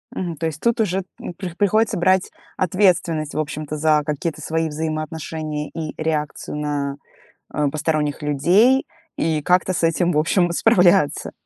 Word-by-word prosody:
Мгм, 175 -4 -4
то 165 - -3
есть 155 -1 -4
тут 235 0 +1
уже, 195 -3 0 0.2
м, - - -6
при 180 -1 -6
приходится 205 +4 +2
брать 185 +1 +2 0.2
ответственность, 175 -4 +1
в - - -1
общем-то, 155 0 -4
за 155 0 +3
какие-то 150 +2 -3
свои 160 0 -1
взаимоотношения 155 0 -4
и 155 -2 -5
реакцию 150 -2 -2
на, 145 -2 -2 0.6
э, 150 -1 +1
посторонних 150 -1 -1
людей 180 - +3 0.3
и 155 -2 0
как-то 180 +4 +2
с 170 - -2
этим, 170 +2 +2
в 150 - +1
общем, 175 +3 +2
справляться. 180 -6 +3
160 Hz, 150 wpm, -21 LUFS, 150-180 Hz, 0.6 s, за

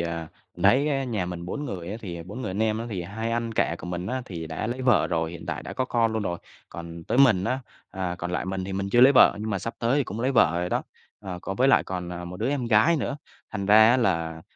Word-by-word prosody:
à, 85 -1 -3 0.3
mình - - -7
thấy 140 +4 +4
á 135 -2 0
nhà 110 -8 -2
mình 90 -1 -6
4 145 +11 -4
người 90 -10 -5
á, 105 - -4
thì 85 -5 -6
4 105 +9 -8
người - - -3
anh 100 +4 -1
em 110 0 +1
á 115 - -4
thì 95 -4 -3
2 110 +5 -4
anh 115 -1 -2
cả 85 - +1
của - - -8
mình 90 +1 -4
á 130 +1 -2
thì 85 -3 -6
đã 80 +6 -4
lấy 125 +3 -3
vợ 120 -5 +4
rồi, 80 -1 -1
hiện 85 0 -9
tại - - -4
đã - - -7
có 130 - -1
con 115 -3 +1
luôn 110 - -1
rồi. 85 -3 -3 0.3
Còn 85 0 -9
tới 125 - -1
mình 110 -9 +5
á, 130 +6 0 0.3
à, 95 -2 -3
còn 90 - -4
lại 90 - -1
mình 95 0 -3
thì 95 - -5
mình 100 +1 -2
chưa 120 - +4
lấy 130 +3 +8
vợ 130 - +6
nhưng 110 +1 -3
mà 100 - -1
sắp 115 +5 -5
tới 120 +4 +1
thì 140 - +1
cũng 110 - -6
lấy 130 +3 +1
vợ 85 - +4
rồi 90 - -2
đó, - - 0 0.4
ờ, 95 -3 -6
có 95 - -4
với 130 +6 +3
lại - - +5
còn, 90 -2 -5
ờ, 90 0 -6
1 90 +1 -7
đứa 110 +7 -1
em 135 -3 -1
gái 115 +9 +4
nữa, 145 -1 -2 0.3
thành 100 -3 -4
ra 110 +2 +7
á 125 - +4
là, 80 -8 0
100 Hz, 295 wpm, -25 LUFS, 90-120 Hz, 0.4 s, lấy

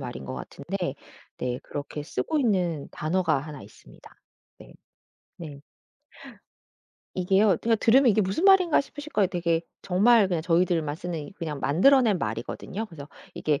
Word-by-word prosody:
말인 65 - -7
것 65 - -6
같은데 140 - -5 0.4
네 125 0 -2
그렇게 145 +1 -6
쓰고 310 - -2
있는 180 - 0
단어가 160 -1 0
1 145 0 -8
있습니다. - - -17 0.4
네. - - -15 0.6
네. 150 -4 -9 1.5
이게요. 190 +1 +3
그냥 230 0 +2
들으면 250 +2 +5
이게 215 - +2
무슨 200 - -1
말인가 380 -4 +5
싶으실 290 +2 -10
거예요. 205 -2 +3
되게 170 -3 0 0.2
정말 210 +4 +4
그냥 170 -3 -1
저희들만 165 -3 +1
쓰는 165 -4 -6
그냥 150 -5 -5
만들어낸 220 - +4
말이거든요. 215 +5 -5
그래서 150 -7 -11 0.3
이게 150 -2 -1
180 Hz, 320 characters per minute, -26 LUFS, 150-215 Hz, 1.5 s, 들으면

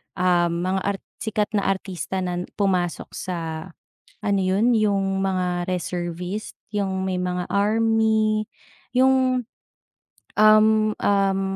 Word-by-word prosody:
ah, 180 -1 +3
mga 180 +3 -1 0.2
ar - - -7 0.2
sikat 215 -1 -1
na 200 -2 0
artista 190 -1 -2
na 180 0 -3
pumasok 185 -4 -1
sa 180 -2 -4 0.8
ano 200 -2 +1
yun? 215 +6 +3
Yung 195 -2 +1
mga 180 -2 -1
reservist 180 +3 -4 0.2
yung 190 -2 -2
may 185 - -1
mga 180 0 -2
army 220 +1 +2 0.5
yung, 255 -1 +3 0.9
um, 215 0 +5
um, 195 -1 +2
195 Hz, 110 wpm, -23 LUFS, 180-215 Hz, 0.9 s, um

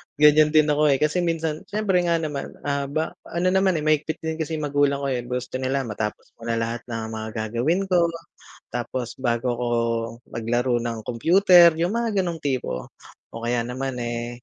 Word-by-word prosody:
Ganyan 150 +1 +5
din 155 -1 +5
ako, 150 +1 +3
eh. 140 - +4
Kasi 150 +5 +1
minsan 165 -3 -1
syempre 205 -3 +1
nga 170 - +3
naman, 150 -4 -4
ah, 140 -1 -1
ba 155 +3 -2 0.2
ano 170 +2 -1
naman, 190 -1 +3
eh, 155 - -1
mahigpit 155 +1 0
din 160 0 -3
kasi 160 0 -2
magulang 145 -2 +1
ko, - - 0
eh. 125 - 0
Gusto 125 +1 -3
nila 135 +1 0
matapos 105 -2 -5
ko 115 - -8
na 115 - 0
lahat 115 +1 -2
ng 115 -1 -4
mga 110 0 -5
gagawin 120 - 0
ko 175 -2 +4 0.7
tapos 120 0 -3
bago 120 -1 -1
ako 120 +1 -3 0.7
maglaro 120 +2 0
ng 115 -1 -3
computer, 170 - +6
yung 175 +5 0
mga 230 -4 0
ganong 170 -3 -4
tipo. 130 - -2 0.4
O 115 - -8
kaya 120 0 +1
naman, 130 +2 -4
eh, 120 0 -4
140 Hz, 185 wpm, -24 LUFS, 120-160 Hz, 0.7 s, computer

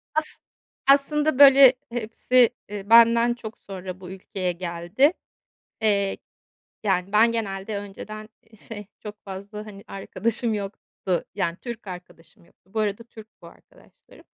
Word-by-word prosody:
As 310 0 +1 0.5
aslında, 295 +1 +3
böyle, 275 -2 +9 0.2
hepsi, 240 +1 +2 0.2
eee, 205 0 -7
benden 235 +1 +6
çok 225 -2 -9
sonra 185 -1 -8
bu 180 - -9
ülkeye 185 -1 -4
geldi. 175 - +1 0.7
Eee, 200 -2 +1 0.7
yani, 190 -1 0
ben 225 +2 +5
genelde 205 -2 -3
önceden, 215 +2 -9 0.2
eee, 220 - -18
şey, 205 -2 -9
çok 210 0 -8
fazla, 200 +2 -8
hani, 200 -1 -11
arkadaşım 220 +4 -2
yoktu. 195 -2 -4
Yani 170 -4 -1
Türk 235 -4 -7
arkadaşım 180 -2 -12
yoktu. 190 +2 -30
Bu 220 - -1
arada 210 +1 -1
Türk 220 -2 -14
bu - - -12
arkadaşlarım. - - -20
210 Hz, 135 wpm, -24 LUFS, 195-230 Hz, 0.7 s, böyle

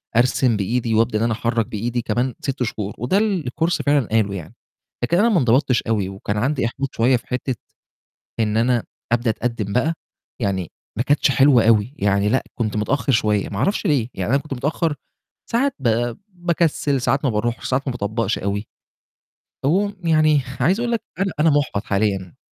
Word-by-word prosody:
أرسم 125 -1 +3
بإيدي 115 +3 -1
وأبدأ 110 -1 +2
إن - - 0
أنا 115 - +1
أحرك 115 0 0
بإيدي 120 +3 -2
كمان 125 +2 -1
6 135 -4 -2
شهور، 105 -3 -3
وده 125 - +1
اللي 200 -6 +1
الCourse 165 +6 0
فعلًا 145 -5 +3
قاله 110 -3 +2
يعني، 85 -5 -8 0.5
لكن 170 - +2
أنا 225 +5 +4
ما 195 - +3
انضبطتش 125 0 +2
أوي 105 -4 0
وكان 100 +2 -4
عندي 130 +4 0
إحباط 135 +3 -3
شوية 125 +3 +3
في 115 - -15
حِتّة 125 0 -2 0.8
إن 110 0 +1
أنا 120 0 +2 0.3
أبدأ 120 0 +2
أتقدّم 110 -3 -3
بقى، 155 +7 +2 0.5
يعني 95 -5 -2 0.3
ما 120 - +1
كانتش 145 0 +3
حلوة 135 -4 +5
أوي، 115 +3 +3
يعني 100 0 +2
لأ 130 +4 +1
كنت 110 -3 -2
متأخّر 135 +6 0
شوية، 105 -4 +1
ما 100 - -5
اعرفش 195 - 0
ليه، 135 - +1
يعني 95 +1 -3
أنا 140 - +3
كنت 150 - -6
متأخّر 150 +4 -1 0.6
ساعات 270 +4 +1
ب 120 -1 0
باكسّل، 170 -6 0
ساعات 135 +3 +1
ما - - +3
باروحش، 115 +3 -2
ساعات 135 +2 0
ما 130 - +1
باطبقش 115 0 -1
أوي، 100 +2 -2 1.0
على 145 - +3
العموم 200 +1 +1
يعني 155 -3 +4 0.2
عايز 180 - +2
أقول 240 0 -1
لك 230 - 0 0.2
أنا 195 -1 +1
أنا 160 +2 +5
محبط 140 -8 0
حاليًا. 100 -3 -1
120 Hz, 185 wpm, -21 LUFS, 110-145 Hz, 1.0 s, حلوة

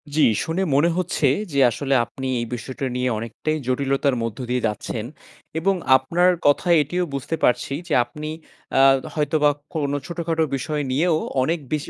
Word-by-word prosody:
জি, 155 - +3 0.2
শুনে 165 +4 -1
মনে 150 +5 +4
হচ্ছে 180 -5 +1 0.3
যে 140 - +1
আসলে 140 +3 -2
আপনি 130 +3 -6
এই 120 - -2
বিষয়টা 130 +3 -5
নিয়ে 125 0 0
অনেকটাই 115 +8 -3
জটিলতার 135 +1 +1
মধ্য 115 -2 -4
দিয়ে 125 -1 0
যাচ্ছেন 105 +1 -4 0.5
এবং 195 +4 +2 0.2
আপনার 170 +8 +2 0.2
কথায় 170 +4 +4
এটিও 175 +5 -2
বুঝতে 140 +4 -2
পারছি 125 +2 +2
যে - - -2
আপনি 150 +5 -7 0.5
আ 135 - +6 0.2
তো - - -7
হয়তোবা 150 -1 +2 0.3
কোন 145 -3 -1
ছোটখাটো 165 -2 -1
বিষয় 150 +3 -2
নিয়েও 155 +4 +2 0.3
অনেক 165 +4 0
বেশি 150 +1 -2
145 Hz, 160 wpm, -22 LUFS, 130-165 Hz, 0.5 s, আ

